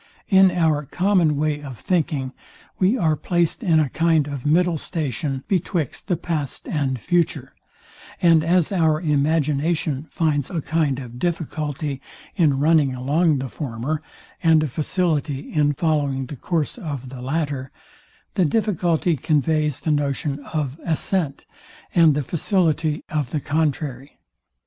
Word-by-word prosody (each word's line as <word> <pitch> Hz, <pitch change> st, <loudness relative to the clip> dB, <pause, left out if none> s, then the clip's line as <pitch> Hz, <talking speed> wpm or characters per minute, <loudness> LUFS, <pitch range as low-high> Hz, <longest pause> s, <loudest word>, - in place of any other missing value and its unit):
In 190 Hz, -1 st, +7 dB
our 160 Hz, -4 st, +1 dB
common 175 Hz, -2 st, +2 dB
way 150 Hz, 0 st, 0 dB
of 135 Hz, -5 st, -8 dB
thinking 145 Hz, -6 st, -1 dB, 0.5 s
we 195 Hz, +7 st, +3 dB
are 160 Hz, -8 st, +2 dB
placed 175 Hz, -, 0 dB
in 170 Hz, -8 st, +3 dB
a 155 Hz, -, +2 dB
kind 165 Hz, -2 st, +2 dB
of 140 Hz, -1 st, -5 dB
middle 170 Hz, +1 st, +3 dB
station 140 Hz, -4 st, -3 dB
betwixt 170 Hz, -6 st, -1 dB
the 180 Hz, -4 st, +1 dB
past 155 Hz, -5 st, -4 dB
and 135 Hz, -4 st, -1 dB
future; 170 Hz, -, 0 dB, 0.7 s
and 165 Hz, -3 st, +5 dB
as 175 Hz, +1 st, +2 dB
our 160 Hz, -5 st, +2 dB
imagination 150 Hz, -1 st, 0 dB
finds 150 Hz, -4 st, 0 dB
a 175 Hz, -, -2 dB
kind 155 Hz, -3 st, 0 dB
of 125 Hz, -2 st, -8 dB
difficulty 150 Hz, -4 st, -3 dB, 0.3 s
in 155 Hz, -7 st, +3 dB
running 145 Hz, -2 st, +3 dB
along 145 Hz, +5 st, +2 dB
the 135 Hz, 0 st, -3 dB
former, 140 Hz, +3 st, -4 dB, 0.4 s
and 160 Hz, -2 st, +4 dB
a -, -, 0 dB
facility 150 Hz, -1 st, -1 dB
in 145 Hz, -1 st, +3 dB
following 145 Hz, -3 st, 0 dB
the 145 Hz, -, -7 dB
course 165 Hz, -, -2 dB
of 140 Hz, -, -5 dB
the 130 Hz, -1 st, -8 dB
latter, 140 Hz, -1 st, -2 dB, 0.6 s
the 185 Hz, -, +2 dB
difficulty 175 Hz, -3 st, +1 dB
conveys 150 Hz, 0 st, 0 dB
the 160 Hz, -, 0 dB
notion 145 Hz, 0 st, -1 dB
of 150 Hz, -1 st, -3 dB
ascent, 165 Hz, -2 st, -1 dB, 0.5 s
and 165 Hz, -4 st, +5 dB
the 150 Hz, -, 0 dB
facility 165 Hz, -, 0 dB
of 150 Hz, -5 st, -1 dB
the 150 Hz, -, -1 dB
contrary. 145 Hz, -2 st, -2 dB
155 Hz, 140 wpm, -22 LUFS, 140-165 Hz, 0.7 s, In